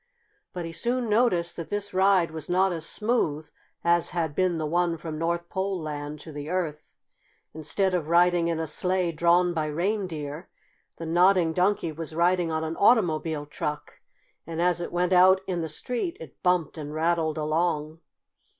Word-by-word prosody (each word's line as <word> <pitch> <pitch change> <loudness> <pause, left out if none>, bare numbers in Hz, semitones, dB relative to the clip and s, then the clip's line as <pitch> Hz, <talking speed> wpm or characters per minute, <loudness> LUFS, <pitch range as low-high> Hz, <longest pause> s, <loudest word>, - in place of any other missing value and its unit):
But 175 -2 -5
he 165 - -6
soon 240 +7 -1
noticed 200 -7 +2
that 170 - -6
this 205 -1 -3
ride 190 -3 +3
was 160 0 -6
not 185 +1 +2
as 165 -1 -1
smooth 165 -10 -1 0.4
as 170 0 +3
had 165 -4 -2
been 180 +1 +1
the 155 - -2
one 170 +2 0
from 155 -1 -6
North 170 +1 -1
Pole 190 +1 -2
Land 150 -1 -5
to 160 - -10
the 145 0 -7
Earth. 165 -4 -4 0.6
Instead 170 +5 0
of 170 -4 -1
riding 175 0 +4
in 165 -1 -1
a 160 - -1
sleigh 180 +3 0
drawn 175 +2 +3
by 155 -2 -1
reindeer, 170 -2 -3 0.5
the 165 - -6
Nodding 175 0 +3
Donkey 180 -1 +1
was 160 0 -7
riding 175 0 +2
on 160 0 -1
an 160 +1 -4
automobile 165 -9 +2
truck, 150 0 -5 0.5
and 165 0 -5
as 175 0 +2
it 170 - -5
went 180 +1 +1
out 185 +1 +6
in 180 -3 -2
the 160 - -3
street 250 - -3
it 160 -5 -12
bumped 180 -4 +1
and 150 0 -6
rattled 160 -1 0
along. 155 0 -1
170 Hz, 175 wpm, -26 LUFS, 160-180 Hz, 0.6 s, out